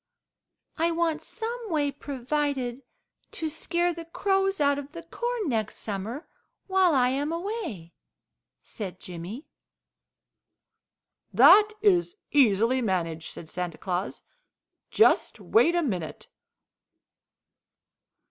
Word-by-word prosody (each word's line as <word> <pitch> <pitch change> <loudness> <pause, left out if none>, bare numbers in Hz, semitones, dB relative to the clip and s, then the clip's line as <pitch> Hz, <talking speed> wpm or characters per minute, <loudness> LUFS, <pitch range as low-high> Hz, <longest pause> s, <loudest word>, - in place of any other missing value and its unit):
"I 330 +1 +2
want 335 -1 0
some 465 0 -5
way 295 -4 +1
provided 275 -2 -2 0.5
to 320 - -2
scare 345 +2 -1
the 335 0 -8
crows 390 +2 0
out 285 -1 +3
of 285 +1 -9
the 335 - -8
corn 475 +4 -3
next 220 -4 -1
summer, 220 - -5 0.4
while 375 -4 +3
I 250 -1 +4
am 285 +4 -1
away," 335 - -5 0.7
said 190 -4 -7
Jimmy. 180 - -8 1.9
"That 430 0 +7
is 365 -3 +3 0.2
easily 245 -1 +4
managed," 165 -6 -2
said 165 - -10
Santa 175 0 -4
Claus. 185 +1 -3 0.7
"Just - - +3
wait 350 -6 +3
a 345 - +2
minute." 180 - -4
290 Hz, 105 wpm, -27 LUFS, 215-345 Hz, 1.9 s, That